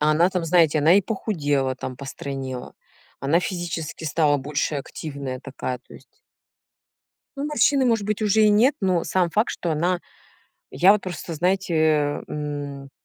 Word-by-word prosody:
а, 150 +1 +3
она 165 +4 +4
там, 180 -3 -2
знаете, 165 -2 +4
она 160 +4 +5
и 200 - +5
похудела, 145 - -1
там, 130 -1 -6
постройнела. 135 -1 -6 0.5
Она 145 +5 +2
физически 170 -3 -4
стала 150 -1 +2
больше 145 +2 -2
активная 140 -2 -5
такая, 130 -2 -5
то - - -18
есть - - -17 1.2
Ну, 280 +1 -3
морщины, 285 -2 +3
может 225 -4 +1
быть, 210 +1 -2
уже 215 0 +3
и 215 - +6
нет, 225 +7 +4
но 185 -4 +1
сам 180 -2 +1
факт, 215 +7 +1
что 170 - -3
она 175 +3 0 0.7
я 180 +9 +5
вот 210 - 0
просто, 175 -2 -6
знаете, 160 -4 +1
м 145 -2 -5
160 Hz, 155 wpm, -23 LUFS, 145-190 Hz, 1.2 s, и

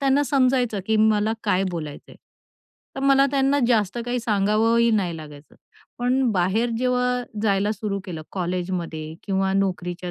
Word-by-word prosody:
त्यांना 275 +1 +3
समजायचं, 255 -5 +1
की 220 0 +2
मला 215 0 +3
काय 195 -2 +2
बोलायचं 155 -4 -7
आहे, - - -14 0.8
तर - - -3
मला 275 0 +5
त्यांना 275 0 +2
जास्त 220 -3 +1
काही 245 +1 -1
सांगावंही 225 +2 +2
नाही 175 -5 -1
लागायचं. 150 -2 -12 0.4
पण 250 +2 +1
बाहेर 200 +6 +1
जेव्हा 250 0 +1 0.2
जायला 205 0 +1
सुरू 200 -1 -3
केलं, 165 -4 -6
कॉलेजमध्ये 175 -3 -3
किंवा 190 -1 0
नोकरीच्या 180 -2 -2
210 Hz, 145 wpm, -23 LUFS, 180-245 Hz, 0.8 s, मला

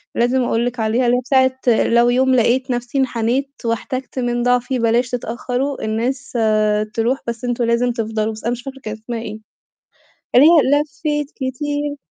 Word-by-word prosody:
لازم 245 +2 +2
أقول 235 0 0
لِك 245 0 -3
عليها، 225 +3 +1
اللي 245 +1 +3
هي - - -1 0.3
بتاعة 260 -3 +1
"لو 235 +1 +4
يوم 260 +1 +3
لقيت 255 +2 +2
نفسي 245 +2 -3
انحنيت 260 +1 0
واحتجت 255 +3 -3
من 240 -1 -1
ضعفي 245 +1 +1
بلاش 235 +2 +2
تتأخروا 250 +3 -3
الناس 240 +5 -2
آآ، 215 -2 +2
تروح 235 +4 0
بس 235 0 -4
أنتم 245 0 -1
لازم 235 +1 +1
تفضلوا" 220 -1 -2
بس 215 - -11
أنا 235 - 0
مش 245 0 -4
فاكرة 270 -1 -8
كانت 215 0 -6
أسمها 235 0 -4
إيه. 215 -1 -7 1.0
اللي 260 +4 +8
هي 290 -4 +5
لفيت 295 -1 -3
كتير. 290 +2 -3
245 Hz, 175 wpm, -19 LUFS, 230-260 Hz, 1.0 s, اللي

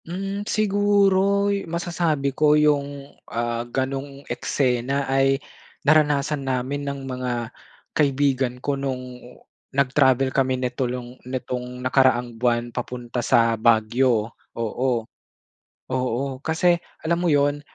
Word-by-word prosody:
Hmm, 195 +4 -4
siguro 200 -1 +3
'yu 200 -4 -4
masasabi 165 -5 -1
ko 150 +2 +4
'yung, 145 -2 0 0.2
ah, 120 0 -2
gano'ng 135 +2 -3
eksena 135 +1 0
ay 135 0 +2 0.5
naranasan 150 -1 +3
namin 135 +1 -2
ng 140 -1 -5
mga 125 -3 -3 0.4
kaibigan 135 -3 +1
ko 140 +3 -2
no'ng 130 -2 -4 0.5
nag-travel 135 -1 +2
kami 130 -1 +1
nito 125 0 -2
long 125 0 -7
nitong 125 0 -5
nakaraang 130 -2 +3
buwan 120 0 0
papunta 125 0 -4
sa 115 0 +3
Baguio, 115 0 +2 0.2
oo. 115 +1 -1 0.8
Oo 130 +1 -1
kasi 175 +2 +3 0.2
alam 170 +2 0
mo - - +3
'yun, 145 -1 +2
135 Hz, 110 wpm, -23 LUFS, 125-145 Hz, 0.8 s, ko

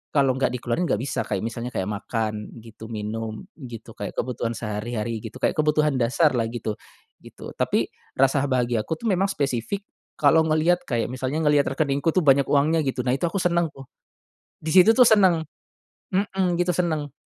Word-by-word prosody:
kalau 135 -2 +4
nggak 130 +1 0
dikeluarin 125 +8 -1
nggak - - +1
bisa 130 +4 -2
kayak - - -2
misalnya 115 +1 -4
kayak 95 -6 -3
makan 105 +1 -3
gitu, 110 0 -11
minum 110 - -5
gitu, 120 -6 -10
kayak 100 - -6
kebutuhan 120 -2 -2
sehari-hari 110 +1 -3
gitu 115 +2 -8
kayak - - +1
kebutuhan 150 -1 +2
dasar 130 +6 +3
lah 115 -2 0
gitu, 115 -2 -4 0.5
gitu. - - -11
Tapi, - - 0 0.3
rasa 135 +1 +3
bahagiaku 125 +3 0
tuh 235 - -10
memang 195 +2 +1
spesifik, 145 - -2 0.3
kalo 155 +2 +5
ngelihat 160 +3 +2
kayak 120 -3 0
misalnya 130 +5 -2
ngelihat 145 -2 +3
rekeningku 140 +1 +1
tuh 185 - +3
banyak 140 0 +5
uangnya 155 +3 +3
gitu 130 -3 -2
nah 125 - +2
itu 170 +6 0
aku 195 - -3
senang 170 -2 +1
tuh. 135 -1 -13 0.8
Di 160 - -2
situ 190 +6 +7
tuh 250 - +7
senang, 190 -8 +5 0.7
mhm, 185 -2 0
gitu 175 0 +2
senang. 155 -5 -1
135 Hz, 175 wpm, -24 LUFS, 115-165 Hz, 0.8 s, situ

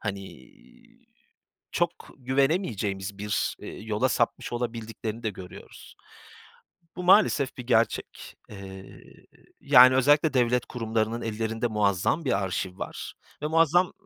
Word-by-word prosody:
hani, 100 - -7 1.2
çok - - +1 0.3
güvenemeyeceğimiz 120 - -1
bir, 105 0 -2
eee, - - -8
yola 110 +4 0
sapmış 115 +1 -1
olabildiklerini 115 -1 -5
de 110 - -1
görüyoruz. 95 -2 -12 1.0
Bu 180 - -5
maalesef 180 -8 +4
bir 125 - -7
gerçek. 115 -2 -1
Eee, 95 -1 -10 0.7
yani, 130 -2 +7
özellikle 145 +3 +3
devlet 125 -1 +2
kurumlarının 115 -1 -2
ellerinde 115 +1 -2
muazzam 105 - 0
bir 100 -6 +1
arşiv 95 0 -4
var - - -7 0.3
ve - - 0
muazzam 165 +3 +3
115 Hz, 110 wpm, -26 LUFS, 105-130 Hz, 1.2 s, yani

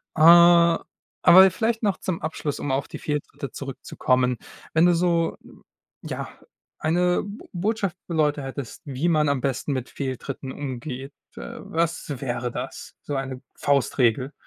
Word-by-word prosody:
Äh, 155 - -1
aber 170 +2 +6
vielleicht 225 +2 -1
noch 200 -2 +1
zum 180 -3 -3
Abschluss, 155 -2 -3
um 145 - -2
auf 135 +1 -1
die - - -8
Fehltritte 145 -3 -4
zurückzukommen. 130 -1 -1 0.4
Wenn 160 +2 +5
du 175 - +5
so 170 -1 +1 0.7
ja, - - -5 0.5
eine 175 +3 +2
Bo 205 +2 -10
Botschaft 195 0 -1
für 170 - -4
Leute 150 -2 +1
hättest, 135 -2 -7
wie 140 +4 -1
man 155 -3 +3
am 140 -2 0
besten 135 +2 -1
mit 130 -2 -3
Fehltritten 135 0 -5
umgeht, 135 0 -6 0.2
äh, - - -7
was 165 0 -1 0.2
wäre 120 -2 -2
das? 125 +3 -7
So 145 - -4
eine 135 -1 -4
Faustregel. 135 -2 +1
145 Hz, 145 wpm, -24 LUFS, 135-170 Hz, 0.7 s, aber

